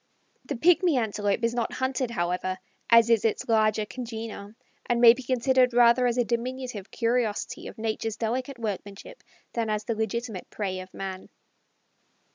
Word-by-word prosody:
The 285 Hz, -, -3 dB
Pigmy 345 Hz, +2 st, +4 dB
Antelope 210 Hz, -2 st, -1 dB
is 230 Hz, 0 st, +1 dB
not 240 Hz, -1 st, -2 dB
hunted, 260 Hz, -1 st, -1 dB
however, 180 Hz, -2 st, -2 dB, 0.3 s
as 230 Hz, -1 st, +7 dB
is 225 Hz, -3 st, +4 dB
its 225 Hz, -, 0 dB
larger 215 Hz, -2 st, +2 dB
congener, 225 Hz, -3 st, -7 dB, 0.3 s
and 240 Hz, -1 st, +1 dB
may 235 Hz, -1 st, +9 dB
be 255 Hz, -, -8 dB
considered 255 Hz, 0 st, +2 dB
rather 245 Hz, +1 st, +5 dB
as 240 Hz, 0 st, 0 dB
a 245 Hz, -, +3 dB
diminutive 240 Hz, -2 st, -4 dB
curiosity 230 Hz, -2 st, -1 dB
of -, -, -10 dB
Natures' 220 Hz, 0 st, -3 dB
delicate 250 Hz, +4 st, -2 dB
workmanship 210 Hz, -, -6 dB, 0.3 s
than 230 Hz, -2 st, -1 dB
as 210 Hz, 0 st, -1 dB
the 230 Hz, -, -2 dB
legitimate 220 Hz, -2 st, -4 dB
prey 190 Hz, -3 st, -3 dB
of 185 Hz, 0 st, -10 dB
man. 190 Hz, -1 st, -7 dB
230 Hz, 155 wpm, -26 LUFS, 210-245 Hz, 0.3 s, may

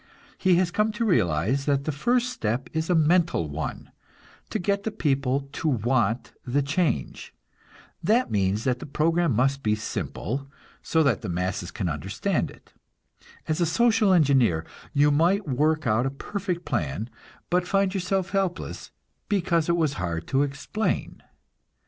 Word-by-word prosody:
He 185 Hz, -2 st, +4 dB
has 175 Hz, 0 st, +2 dB
come 210 Hz, +4 st, +1 dB
to 230 Hz, +2 st, -1 dB
realize 110 Hz, -, +1 dB
that 140 Hz, -1 st, +1 dB
the 155 Hz, -, -1 dB
first 245 Hz, -, +1 dB
step 120 Hz, -, -2 dB
is 160 Hz, +1 st, -2 dB
a 180 Hz, -, +4 dB
mental 165 Hz, -, +3 dB
one; 75 Hz, +1 st, -5 dB, 0.6 s
to -, -, -1 dB
get 200 Hz, +3 st, 0 dB
the 220 Hz, -, -2 dB
people 140 Hz, -9 st, 0 dB
to 160 Hz, -, -3 dB
want 120 Hz, -3 st, +1 dB
the 135 Hz, +3 st, 0 dB
change. 145 Hz, 0 st, -1 dB, 0.7 s
That 230 Hz, +8 st, +2 dB
means 100 Hz, +1 st, +1 dB
that 125 Hz, -2 st, 0 dB
the -, -, -8 dB
program 165 Hz, +3 st, +1 dB
must 135 Hz, +4 st, +2 dB
be 105 Hz, -3 st, +1 dB
simple, 130 Hz, +4 st, -4 dB, 0.3 s
so 160 Hz, -1 st, +2 dB
that 130 Hz, -8 st, +2 dB
the -, -, -5 dB
masses 90 Hz, 0 st, -2 dB
can 95 Hz, -, -3 dB
understand 75 Hz, -3 st, -1 dB
it. -, -, -17 dB, 0.7 s
As 155 Hz, +2 st, 0 dB
a -, -, +4 dB
social 225 Hz, +3 st, +3 dB
engineer 130 Hz, -, +3 dB, 0.3 s
you 145 Hz, 0 st, +4 dB
might 170 Hz, +6 st, +2 dB
work 150 Hz, +4 st, +1 dB
out 120 Hz, +3 st, +2 dB
a -, -, 0 dB
perfect 180 Hz, +5 st, -4 dB
plan, 75 Hz, +10 st, -2 dB, 0.4 s
but 180 Hz, 0 st, +2 dB
find 195 Hz, -1 st, +2 dB
yourself 190 Hz, 0 st, -1 dB
helpless, 190 Hz, -2 st, -2 dB, 0.4 s
because 170 Hz, -5 st, +1 dB
it 170 Hz, -, +3 dB
was 155 Hz, -4 st, +1 dB
hard 85 Hz, -2 st, -3 dB
to 135 Hz, -, +2 dB
explain. 145 Hz, +10 st, -2 dB
145 Hz, 155 wpm, -25 LUFS, 120-180 Hz, 0.7 s, He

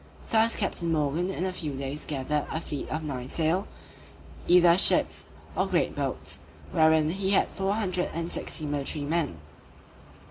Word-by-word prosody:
Thus 225 Hz, +1 st, +4 dB
Captain 175 Hz, -5 st, -1 dB
Morgan 155 Hz, +3 st, 0 dB
in 190 Hz, -1 st, -2 dB
a 185 Hz, -, -2 dB
few 150 Hz, -6 st, -5 dB
days 140 Hz, +2 st, -5 dB
gathered 145 Hz, +1 st, -2 dB
a 160 Hz, -, -2 dB
fleet 150 Hz, -3 st, -5 dB
of 155 Hz, +1 st, -3 dB
nine 130 Hz, -4 st, -5 dB
sail, 165 Hz, +4 st, 0 dB, 0.8 s
either 175 Hz, -1 st, +6 dB
ships 190 Hz, -, +5 dB, 0.3 s
or -, -, +1 dB
great -, -, 0 dB
boats, -, -, -3 dB, 0.3 s
wherein 160 Hz, -1 st, +4 dB
he 190 Hz, +1 st, -1 dB
had -, -, +3 dB
four 195 Hz, +1 st, -1 dB
hundred 185 Hz, -4 st, -1 dB
and 170 Hz, +1 st, -4 dB
sixty 155 Hz, -, -4 dB
military 145 Hz, 0 st, -3 dB
men. 155 Hz, -, -1 dB
160 Hz, 155 wpm, -27 LUFS, 150-185 Hz, 0.8 s, either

